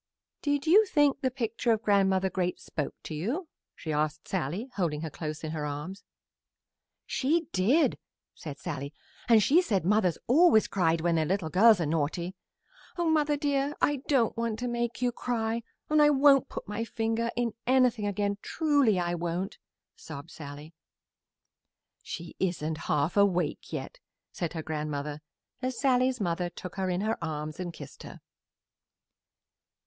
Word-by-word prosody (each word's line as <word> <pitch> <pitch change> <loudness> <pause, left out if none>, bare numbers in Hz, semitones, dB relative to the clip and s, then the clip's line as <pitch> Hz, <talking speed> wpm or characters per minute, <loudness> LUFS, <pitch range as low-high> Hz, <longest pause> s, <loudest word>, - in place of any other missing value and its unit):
"Did 285 0 0
you 385 +7 +7
think 290 -4 +3
the 260 - +2
picture 235 -2 -1
of 220 0 +1
Grandmother 190 -2 +3
Great 180 -1 -1
spoke 150 - -4
to - - -6
you?" 240 - -2 0.3
she 155 - -4
asked 155 +1 -1
Sallie, 190 - -3
holding 160 -6 -1
her 160 -1 -5
close 155 +1 -5
in 155 - -3
her 155 -2 -3
arms. 150 +7 -5 1.0
"She 320 +5 +1
did," 230 - +3 0.3
said 150 -4 -8
Sallie, 145 -3 -5 0.3
"and 225 -3 +7
she 320 - +5
said 195 - 0
mothers 185 -4 +2
always 270 -4 +5
cried 165 -4 +1
when 170 +1 +2
their 160 -1 +2
little 180 -4 -1
girls 215 +2 +6
are 170 - 0
naughty. 165 +4 -1 0.6
Oh, 340 -2 +1
mother 300 -2 +2
dear, 285 -1 0
I 290 - +2
don't 255 -6 +2
want 230 -2 -2
to 245 +2 -3
make 240 0 -2
you 245 - +2
cry, 230 -1 -2 0.3
and 305 0 +4
I 295 - +7
won't 275 -2 +5
put - - -7
my 210 +2 -3
finger 225 0 -1
in 235 -2 0
anything 250 -4 +3
again, 205 0 -1
truly 285 - +2
I 175 -1 0
won't!" 175 +2 -3 0.4
sobbed 155 +1 -9
Sallie. 145 +1 -9 1.3
"She 170 -1 -7
isn't 160 -4 -1
half 150 +4 +1
awake 200 -3 +1
yet," - - -6 0.3
said 170 -4 -4
her 160 -2 -4
grandmother 150 -1 -4 0.4
as 255 -1 -2
Sallie's 255 -1 +2
mother 175 -2 -1
took 180 0 -8
her 190 -1 0
in 180 +1 0
her 215 -4 -1
arms 155 0 -4
and 180 -1 -3
kissed - - -11
her. - - -10
200 Hz, 160 wpm, -29 LUFS, 165-250 Hz, 1.3 s, you